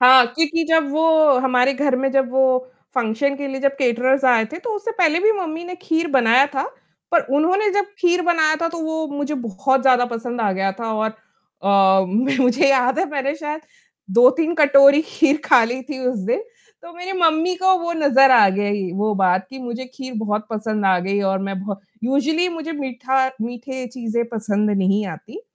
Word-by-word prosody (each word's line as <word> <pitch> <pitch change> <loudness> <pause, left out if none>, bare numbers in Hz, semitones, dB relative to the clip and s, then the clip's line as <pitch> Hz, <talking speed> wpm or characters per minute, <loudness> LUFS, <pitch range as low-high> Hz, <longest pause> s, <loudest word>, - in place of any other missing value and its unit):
हाँ, 255 0 +7
क्योंकि 325 +5 -1
जब 320 -3 +2
वो 315 +3 +1 0.3
हमारे 255 0 +2
घर 275 -1 0
में 270 +1 -1
जब 265 -2 +1
वो 260 -1 +1 0.3
फंक्शन 250 +3 -1
के 285 0 -5
लिए 265 0 -5
जब 275 0 0
कैटरर्स 260 +1 +1
आए 235 -3 +4
थे, 325 - -6
तो 465 +5 -6
उससे 415 +3 -5
पहले 330 -2 +3
भी 430 +2 +3
मम्मी 345 -4 -5
ने 360 +1 -7
खीर 330 -3 -1
बनाया 255 +1 +4
था। 270 - 0 0.5
पर 335 - +5 0.2
उन्होंने 380 +7 +1
जब 405 0 +1
खीर 355 0 +1
बनाया 320 -3 +2
था 335 - 0
तो 335 0 -7
वो 320 0 -3
मुझे 285 0 -4
बहुत 250 +2 -1
ज़्यादा 255 -2 +4
पसंद 235 +1 -5
आ 210 -3 +1
गया 195 +1 -1
था 225 +2 -5
और 220 0 -1
अ, 195 -3 0
मैं 250 +8 0
मुझे 250 +1 +3
याद 260 +2 +2
है 370 - +2
मैंने 280 0 -2
शायद 300 0 -6 0.5
2-3 265 - +3
कटोरी 285 -2 +5
खीर 310 -1 +1
खा 255 -4 +5
ली 245 +3 -4
थी 265 +1 -8
उस 250 -3 -1
दिन। 240 - -1 0.4
तो 340 - -13
मेरी 360 +2 -7
मम्मी 330 +2 +2
को 375 +1 +3
वो 340 -1 -3
नज़र 270 -4 +4
आ 225 -5 +6
गई 205 -1 -2
वो 210 0 0
बात 185 -1 +1
कि 265 - -10
मुझे 245 0 -6
खीर 260 -2 -8
बहुत 210 0 -3
पसंद 215 -1 -3
आ 185 -1 +3
गई 195 +3 -2
और 195 - -1
मैं 195 0 -4
बहुत 200 -1 -6 0.2
यूज़ुअली 305 +7 0
मुझे 330 -1 -6
मीठा 265 -2 -1
मीठे 245 +3 -6
चीजें 235 -1 -4
पसंद 210 -2 -2
नहीं 195 +1 0
आती। 385 - -10
265 Hz, 195 wpm, -20 LUFS, 225-315 Hz, 0.5 s, हाँ